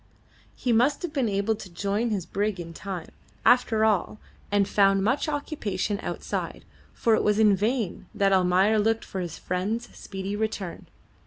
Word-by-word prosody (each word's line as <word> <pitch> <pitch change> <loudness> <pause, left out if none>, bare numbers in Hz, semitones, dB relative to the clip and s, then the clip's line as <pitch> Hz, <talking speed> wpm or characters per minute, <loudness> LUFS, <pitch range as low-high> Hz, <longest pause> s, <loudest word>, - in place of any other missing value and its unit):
He 245 -3 0
must 260 +8 +3
have 340 -3 -4
been 260 -6 +1
able 200 +2 +1
to 205 -3 -9
join 200 +6 -1
his 200 -6 -2
brig 205 -1 -1
in 165 -1 -7
time, 185 -1 -6 0.4
after 225 -3 +4
all, 215 -1 +1 0.3
and 200 -1 +3
found 195 -1 +3
much 265 +8 +1
occupation 215 -9 -2
outside, - - -4 0.3
for 230 - +1
it 220 - +3
was 210 0 +2
in 210 -2 +5
vain 215 0 -1
that 200 -2 +3
Almayer 190 +3 +4
looked 225 +2 +1
for 190 - -5
his 170 -2 -5
friend's 205 +6 -3
speedy 195 +1 -5
return. 205 -4 -4
205 Hz, 165 wpm, -26 LUFS, 195-225 Hz, 0.4 s, in